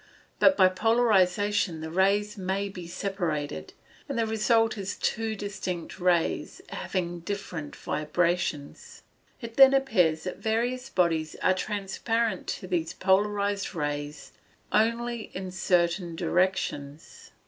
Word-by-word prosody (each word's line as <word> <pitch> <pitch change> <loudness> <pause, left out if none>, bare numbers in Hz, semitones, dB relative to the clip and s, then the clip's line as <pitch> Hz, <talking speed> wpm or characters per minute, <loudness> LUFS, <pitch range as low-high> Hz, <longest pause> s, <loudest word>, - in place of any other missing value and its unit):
But 285 0 +5
by 185 - +7
polarization 205 -4 +2
the 160 0 -5
rays 200 +4 +2
may 195 0 -2
be 180 -3 -8
separated, 170 - -3 0.4
and - - -2
the 230 - +2
result 225 +1 +2
is 195 -2 -4
two 225 0 -1
distinct 190 -4 -5
rays, 175 -2 +1
having 175 -2 -3
different 170 -5 -5
vibrations. 170 -1 -2 0.4
It 230 -1 -8
then 270 0 +8
appears 180 -13 +2
that 185 - -5
various 245 +4 -1
bodies 165 -6 +1
are 185 - +5
transparent 210 +4 -2
to 185 - -4
these 170 -3 -1
polarized 200 +1 +1
rays 145 -1 -4 0.4
only 230 +1 0
in 185 0 -5
certain 175 -1 +1
directions. 165 -5 -2
190 Hz, 115 wpm, -27 LUFS, 170-215 Hz, 0.4 s, then